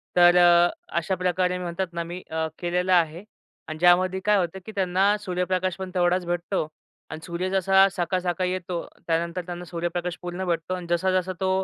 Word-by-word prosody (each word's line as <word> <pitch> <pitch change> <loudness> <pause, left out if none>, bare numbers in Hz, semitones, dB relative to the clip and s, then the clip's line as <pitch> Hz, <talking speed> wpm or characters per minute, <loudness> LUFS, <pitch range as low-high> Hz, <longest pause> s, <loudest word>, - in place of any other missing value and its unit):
तर 175 0 +7
अ, 175 0 +6 0.3
अशा 170 +3 0
प्रकारे 180 0 0
मी 180 - -5
म्हणतात 175 +1 -3
ना, 170 0 -2
मी 175 +2 -7
अ, 160 0 -1
केलेलं 180 +1 0
आहे 170 +1 +2 0.5
आणि 155 - -6
ज्यामध्ये 180 +2 +4
काय 210 -1 +4
होतं, 180 0 -1
की 220 - -7
त्यांना 190 +1 +2
सूर्यप्रकाशपण 185 0 -2
तेवढाच 180 0 +2
भेटतो 175 -1 -2 0.5
अन् 155 - -6
सूर्य 175 +2 -3
जसा 190 0 +4
सकाळ-सकाळी 180 +1 -1
येतो, 180 -2 -3 0.3
त्यानंतर 170 +2 -1
त्यांना 175 0 -6
सूर्यप्रकाश 175 +1 -3
पूर्ण 180 +1 -4
भेटतो 170 +1 -1
अन् 180 -2 -7
जसा-जसा 185 +1 +1
तो 190 - +1
180 Hz, 170 wpm, -25 LUFS, 175-185 Hz, 0.5 s, तर